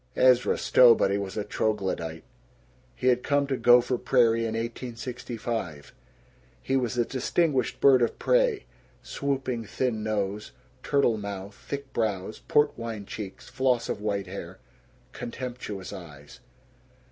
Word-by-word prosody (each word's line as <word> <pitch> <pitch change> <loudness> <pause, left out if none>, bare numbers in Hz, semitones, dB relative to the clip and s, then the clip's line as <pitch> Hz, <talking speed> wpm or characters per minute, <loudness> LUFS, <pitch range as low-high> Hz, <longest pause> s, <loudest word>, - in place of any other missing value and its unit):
Ezra 125 -1 +4
Stowbody 115 -5 +5
was 100 0 -5
a 105 - 0
troglodyte. 95 -6 -2 0.7
He - - -6
had 125 -1 +4
come 145 +1 +1
to 135 -1 -1
Gopher 120 0 +4
Prairie 115 -2 +3
in 110 - -3
1865. 115 - -5 0.7
He 135 - -1
was 125 -2 0
a 120 - +2
distinguished 135 0 0
bird 135 -2 +6
of 120 - +1
prey - - +2 0.4
swooping 135 -4 -2
thin 115 0 -2
nose, 105 -1 -2 0.3
turtle 130 -7 +2
mouth, 100 -1 -6
thick 140 +5 -7
brows, 105 -3 -2
port 150 0 +3
wine 115 -3 -5
cheeks, 100 -1 -8
floss 130 -2 0
of - - -3
white 100 -2 -1
hair, 95 +1 -8 0.5
contemptuous 120 -5 -6
eyes. 75 -5 -11
115 Hz, 125 wpm, -27 LUFS, 100-130 Hz, 0.7 s, bird